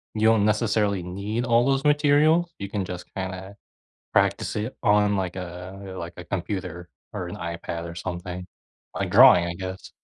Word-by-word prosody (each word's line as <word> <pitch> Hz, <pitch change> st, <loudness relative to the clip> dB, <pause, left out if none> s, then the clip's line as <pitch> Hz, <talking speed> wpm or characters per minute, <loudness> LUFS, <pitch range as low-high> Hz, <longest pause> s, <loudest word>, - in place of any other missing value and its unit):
you 110 Hz, +1 st, +3 dB
don't 110 Hz, -2 st, +4 dB
necessarily 105 Hz, -3 st, +1 dB
need 100 Hz, +7 st, -3 dB
all 120 Hz, 0 st, +4 dB
those 135 Hz, 0 st, +1 dB
materials, 150 Hz, +3 st, +4 dB
you 100 Hz, -1 st, -6 dB
can 100 Hz, -1 st, -2 dB
just 90 Hz, 0 st, -6 dB
kinda 95 Hz, +1 st, -5 dB, 0.6 s
practice -, -, +1 dB
it 110 Hz, +4 st, -3 dB
on, 105 Hz, 0 st, +4 dB
like, 95 Hz, -2 st, -2 dB
a, 95 Hz, +2 st, -7 dB
like, 85 Hz, 0 st, -6 dB
a 90 Hz, -, -7 dB
computer 90 Hz, -2 st, -4 dB, 0.3 s
or -, -, -4 dB
an -, -, -6 dB
iPad 85 Hz, 0 st, -5 dB
or 85 Hz, -, -9 dB
something. 90 Hz, +1 st, -5 dB, 0.5 s
Like, -, -, -2 dB
drawing, 85 Hz, -1 st, +8 dB
I 85 Hz, -, -3 dB
guess. 95 Hz, 0 st, -7 dB
95 Hz, 165 wpm, -25 LUFS, 90-110 Hz, 0.6 s, drawing